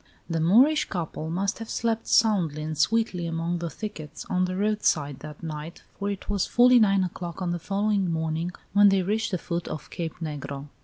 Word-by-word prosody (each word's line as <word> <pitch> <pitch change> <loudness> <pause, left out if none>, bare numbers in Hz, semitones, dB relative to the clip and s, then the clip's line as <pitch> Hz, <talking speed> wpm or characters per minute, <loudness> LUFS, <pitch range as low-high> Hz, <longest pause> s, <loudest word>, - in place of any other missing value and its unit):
The 165 -2 -1
Moorish 245 - +5
couple 160 -3 -4
must 195 +6 -1
have 225 - -7
slept 230 -1 -1
soundly 180 -9 +3
and 155 0 -3
sweetly 180 +2 +1
among 165 +1 -2
the 170 0 -3
thickets 165 -7 -7
on 185 0 +2
the 185 0 -3
roadside 190 -9 +1
that 150 +1 -10
night, 155 +1 -6 0.2
for 200 0 -1
it 200 -2 -5
was 200 -2 0
fully 245 +1 +6
nine 200 -3 +4
o'clock 175 0 -5
on 180 -2 -1
the 175 - -2
following 200 0 0
morning 160 +1 -1 0.2
when 205 0 +7
they 195 -1 +2
reached 215 +4 0
the 185 - -1
foot 170 0 -4
of 150 - -7
Cape 165 -2 -4
Negro. 145 -3 -6
180 Hz, 195 wpm, -26 LUFS, 160-205 Hz, 0.2 s, when